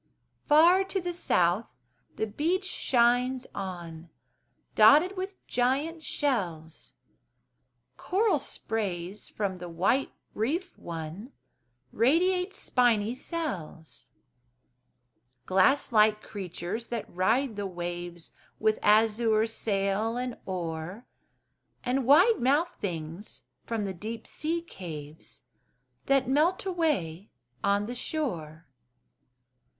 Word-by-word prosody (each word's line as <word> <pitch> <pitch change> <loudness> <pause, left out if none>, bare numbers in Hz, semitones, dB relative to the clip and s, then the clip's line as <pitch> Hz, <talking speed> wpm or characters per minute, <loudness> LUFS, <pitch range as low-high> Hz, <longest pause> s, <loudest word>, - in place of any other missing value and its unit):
Far 340 +6 +6
to 385 0 -2
the 355 -1 -3
south 180 - +1 0.5
the - - -1
beach 330 - -1
shines 250 -5 +2
on, 175 -4 -7 0.6
Dotted 350 +7 +6
with 380 +1 -6
giant 280 +7 0
shells; 175 - -2 1.0
Coral 395 -4 +1
sprays 200 -7 -4
from 195 -3 -3
the 175 0 -7
white 190 +11 +1 0.2
reef 325 - -2
won, 170 - -7 0.6
Radiate 360 - +2
spiny 230 -3 +2
cells; 225 - -6 1.4
Glass 195 +11 +3
like 215 -1 +4
creatures 190 +3 -5
that 235 -3 -4
ride 225 +7 +1
the 200 -1 -3
waves, 175 -1 -6 0.3
With 215 0 +2
azure 220 +1 +4
sail 215 0 -1
and 250 -1 -3
oar, 180 +3 -4 0.8
And 255 0 0
wide 365 - +6
mouthed 295 +8 +1
things 165 - -6 0.2
from 225 -3 -2
the 195 - -3
deep 220 +5 -6
sea 330 +2 -2
caves 160 - -9 0.6
That 275 -2 +3
melt 315 +9 +2
away 280 - -1 0.3
on 200 +1 +2
the 240 - -5
shore. 175 - -4
225 Hz, 100 wpm, -28 LUFS, 180-285 Hz, 1.4 s, Far